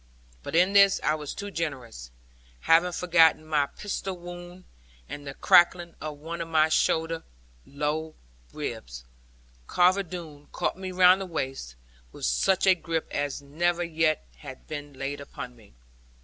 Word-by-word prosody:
But 65 Hz, -, -6 dB
in 180 Hz, +4 st, +4 dB
this 200 Hz, -1 st, +6 dB
I 155 Hz, -, +2 dB
was 150 Hz, -2 st, -5 dB
too 200 Hz, 0 st, -6 dB
generous; 130 Hz, -, -5 dB, 0.5 s
having 170 Hz, +2 st, +4 dB
forgotten 165 Hz, -3 st, +4 dB
my 150 Hz, -2 st, +1 dB
pistol 195 Hz, 0 st, -5 dB
wound, 175 Hz, +1 st, -10 dB, 0.4 s
and 145 Hz, -1 st, -8 dB
the 135 Hz, -, -6 dB
cracking 175 Hz, 0 st, +4 dB
of 150 Hz, -1 st, -5 dB
one 165 Hz, +3 st, -6 dB
of 165 Hz, -, -4 dB
my 160 Hz, -1 st, +3 dB
short 160 Hz, +1 st, +2 dB, 0.6 s
lower 150 Hz, +2 st, -3 dB, 0.4 s
ribs. -, -, -6 dB, 0.6 s
Carver 185 Hz, +2 st, +3 dB
Doone 160 Hz, -5 st, -9 dB
caught -, -, -1 dB
me 185 Hz, 0 st, -6 dB
round 185 Hz, +1 st, +5 dB
the 190 Hz, -, -4 dB
waist, 135 Hz, -, -4 dB, 0.4 s
with -, -, -6 dB
such 185 Hz, -, +2 dB
a 190 Hz, -, +7 dB
grip 165 Hz, -2 st, -3 dB
as 145 Hz, 0 st, -3 dB
never 170 Hz, +5 st, 0 dB
yet 160 Hz, -2 st, 0 dB
had 135 Hz, -3 st, -11 dB
been 145 Hz, -1 st, -7 dB
laid 140 Hz, +1 st, -5 dB
upon 125 Hz, -3 st, -8 dB
me. 105 Hz, -, -20 dB
160 Hz, 150 wpm, -27 LUFS, 145-175 Hz, 0.6 s, a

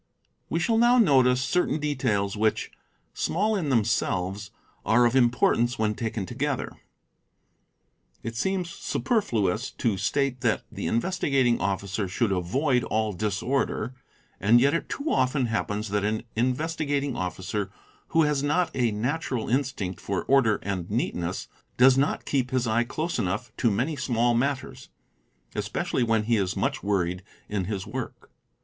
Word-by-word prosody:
We 165 Hz, -, 0 dB
shall 225 Hz, +5 st, +2 dB
now 240 Hz, +1 st, +5 dB
notice 130 Hz, -, +4 dB
certain 160 Hz, +2 st, +1 dB
details 125 Hz, -9 st, 0 dB
which, 110 Hz, +1 st, 0 dB, 0.4 s
small 210 Hz, +6 st, 0 dB
in 170 Hz, -8 st, -1 dB
themselves, 100 Hz, -4 st, 0 dB, 0.3 s
are 120 Hz, +2 st, +4 dB
of 120 Hz, +2 st, +2 dB
importance 120 Hz, 0 st, +3 dB
when 110 Hz, -1 st, +1 dB
taken 110 Hz, -2 st, -3 dB
together. 135 Hz, +4 st, -2 dB, 1.5 s
It 115 Hz, +1 st, -5 dB
seems 180 Hz, +5 st, -1 dB
superfluous 120 Hz, -, 0 dB
to 110 Hz, -6 st, -1 dB
state 135 Hz, +4 st, 0 dB
that 115 Hz, -3 st, +1 dB
the -, -, -4 dB
Investigating 135 Hz, -3 st, +1 dB
Officer 100 Hz, +1 st, -1 dB
should 100 Hz, +4 st, 0 dB
avoid 125 Hz, -, +1 dB
all 110 Hz, -1 st, 0 dB
disorder, 110 Hz, +5 st, -1 dB, 0.5 s
and 110 Hz, +4 st, +5 dB
yet 140 Hz, +3 st, +3 dB
it 165 Hz, -, -2 dB
too 285 Hz, -, -4 dB
often 130 Hz, +1 st, +2 dB
happens 110 Hz, -2 st, -2 dB
that 100 Hz, 0 st, 0 dB
an 110 Hz, +1 st, -1 dB
Investigating 140 Hz, +2 st, 0 dB
Officer 95 Hz, +1 st, -3 dB, 0.4 s
who 165 Hz, -, +3 dB
has 150 Hz, -2 st, +1 dB
not 150 Hz, +5 st, +1 dB
a 125 Hz, -3 st, +2 dB
natural 125 Hz, +2 st, -2 dB
instinct 125 Hz, -8 st, -1 dB
for 100 Hz, -2 st, -2 dB
order 130 Hz, -6 st, +4 dB
and 95 Hz, -3 st, -3 dB
neatness 90 Hz, -6 st, -2 dB, 0.3 s
does 130 Hz, +1 st, +7 dB
not 140 Hz, +2 st, 0 dB
keep 130 Hz, -3 st, 0 dB
his 130 Hz, -1 st, 0 dB
eye 115 Hz, +1 st, +2 dB
close 155 Hz, +4 st, -3 dB
enough 105 Hz, +3 st, -2 dB
to 120 Hz, -, +3 dB
many 130 Hz, +10 st, 0 dB
small 120 Hz, -3 st, +1 dB
matters, 130 Hz, +3 st, -2 dB, 0.6 s
especially -, -, -2 dB
when 115 Hz, -2 st, +2 dB
he 115 Hz, +1 st, +2 dB
is 95 Hz, -2 st, -1 dB
much -, -, -1 dB
worried 90 Hz, -2 st, 0 dB, 0.3 s
in 100 Hz, -3 st, -2 dB
his 95 Hz, -1 st, -3 dB
work. -, -, -7 dB
120 Hz, 145 wpm, -26 LUFS, 105-140 Hz, 1.5 s, does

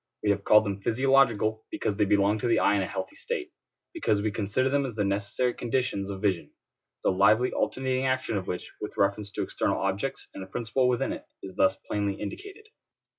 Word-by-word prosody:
We 105 Hz, -, +3 dB
have 100 Hz, 0 st, -1 dB
called 105 Hz, +1 st, +6 dB
them 100 Hz, -1 st, -3 dB
physiological 115 Hz, -3 st, +2 dB
because 100 Hz, -, -2 dB
they 105 Hz, 0 st, +2 dB
belong 100 Hz, +1 st, +3 dB
to 120 Hz, -, -1 dB
the 115 Hz, -, +3 dB
eye -, -, +4 dB
in 100 Hz, -, +1 dB
a 95 Hz, -, -2 dB
healthy 95 Hz, -1 st, -5 dB
state; 405 Hz, -7 st, -4 dB, 0.4 s
because 320 Hz, -, +1 dB
we 105 Hz, +1 st, 0 dB
consider 105 Hz, +5 st, 0 dB
them 140 Hz, +1 st, +2 dB
as 125 Hz, -5 st, -5 dB
the 105 Hz, -, 0 dB
necessary 100 Hz, +5 st, 0 dB
conditions 120 Hz, -5 st, -1 dB
of 95 Hz, 0 st, -6 dB
vision; 95 Hz, -5 st, 0 dB, 0.5 s
the -, -, +3 dB
lively 105 Hz, +6 st, +4 dB
alternating 130 Hz, 0 st, 0 dB
action 130 Hz, -3 st, 0 dB
of 95 Hz, -2 st, -3 dB
which, 90 Hz, -, -4 dB
with -, -, -6 dB
reference 100 Hz, +1 st, +1 dB
to -, -, -1 dB
external -, -, -1 dB
objects 100 Hz, +8 st, -2 dB
and 95 Hz, -, -7 dB
a -, -, -10 dB
principle 120 Hz, +5 st, 0 dB
within 125 Hz, -1 st, 0 dB
it, -, -, -8 dB, 0.2 s
is 95 Hz, -1 st, -8 dB
thus 95 Hz, -, +3 dB
plainly 100 Hz, -1 st, -1 dB
indicated. 400 Hz, -, -7 dB
105 Hz, 205 wpm, -27 LUFS, 100-130 Hz, 0.5 s, called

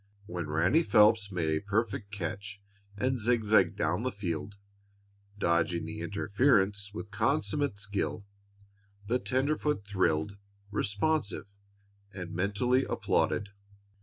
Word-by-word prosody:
When 85 Hz, -4 st, -5 dB
Ranny 85 Hz, -, +3 dB
Phelps 105 Hz, -6 st, +4 dB
made 85 Hz, -4 st, 0 dB
a 80 Hz, -, +1 dB
perfect 105 Hz, +1 st, -1 dB
catch 100 Hz, +1 st, -5 dB, 0.4 s
and 130 Hz, +3 st, 0 dB
zigzagged 110 Hz, -5 st, +3 dB
down -, -, 0 dB
the 130 Hz, +1 st, -1 dB
field, 95 Hz, -1 st, -4 dB, 0.8 s
dodging 85 Hz, -2 st, +1 dB
the 80 Hz, -, -6 dB
interference 100 Hz, +1 st, +1 dB
with 100 Hz, 0 st, -7 dB
consummate 145 Hz, -4 st, 0 dB
skill, 100 Hz, 0 st, -3 dB, 0.8 s
the 120 Hz, +4 st, +1 dB
tenderfoot 140 Hz, -2 st, 0 dB
thrilled 95 Hz, -1 st, 0 dB, 0.3 s
responsive 105 Hz, +6 st, -1 dB, 0.7 s
and 90 Hz, -3 st, -7 dB
mentally 105 Hz, +8 st, +1 dB
applauded. 100 Hz, -, 0 dB
100 Hz, 105 wpm, -30 LUFS, 90-120 Hz, 0.8 s, Phelps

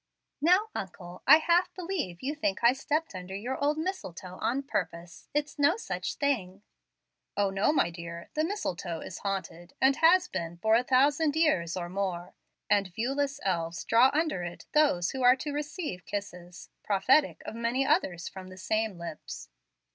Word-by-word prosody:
"Now, 365 Hz, +7 st, +4 dB
uncle, 180 Hz, -2 st, -7 dB
I -, -, +10 dB
half 340 Hz, +3 st, +2 dB
believe 335 Hz, -, -4 dB
you 280 Hz, +3 st, -1 dB
think 305 Hz, -4 st, -2 dB
I 235 Hz, +1 st, +7 dB
stepped 300 Hz, +3 st, -2 dB
under 185 Hz, +1 st, -7 dB
your 250 Hz, +7 st, -3 dB
old 295 Hz, +1 st, +2 dB
mistletoe 190 Hz, -, -5 dB
on 270 Hz, +4 st, 0 dB
purpose. 175 Hz, -, -4 dB
It's 295 Hz, 0 st, -2 dB
no 290 Hz, +7 st, +4 dB
such -, -, -4 dB
thing." 205 Hz, -9 st, -1 dB, 0.7 s
"O, 200 Hz, -1 st, +2 dB
no, 195 Hz, +7 st, +2 dB
my 225 Hz, -, +2 dB
dear. 170 Hz, 0 st, -8 dB
The 310 Hz, -, +1 dB
mistletoe 185 Hz, -, -3 dB
is 185 Hz, -, -7 dB
haunted, 185 Hz, -3 st, -5 dB
and 270 Hz, +1 st, +4 dB
has 360 Hz, +3 st, +5 dB
been 170 Hz, 0 st, -4 dB
for 220 Hz, +4 st, +2 dB
a 235 Hz, +2 st, +5 dB
thousand 285 Hz, +4 st, +3 dB
years 185 Hz, -, +2 dB
or 175 Hz, -1 st, -3 dB
more, 180 Hz, -1 st, -3 dB, 0.3 s
and 200 Hz, -2 st, +3 dB
viewless 275 Hz, +9 st, -2 dB
elves 170 Hz, -3 st, -1 dB
draw 235 Hz, +3 st, +5 dB
under 310 Hz, -, 0 dB
it 175 Hz, 0 st, -7 dB
those 280 Hz, -, +3 dB
who 265 Hz, -, -4 dB
are 250 Hz, 0 st, +7 dB
to 290 Hz, +3 st, -5 dB
receive 295 Hz, -, -4 dB
kisses, 180 Hz, -4 st, -7 dB
prophetic 250 Hz, +9 st, +3 dB
of -, -, -5 dB
many 235 Hz, +4 st, 0 dB
others 185 Hz, -, +1 dB
from 190 Hz, -1 st, -9 dB
the 185 Hz, -, -11 dB
same 215 Hz, +1 st, -1 dB
lips." 170 Hz, -, -8 dB
225 Hz, 170 wpm, -29 LUFS, 180-295 Hz, 0.7 s, I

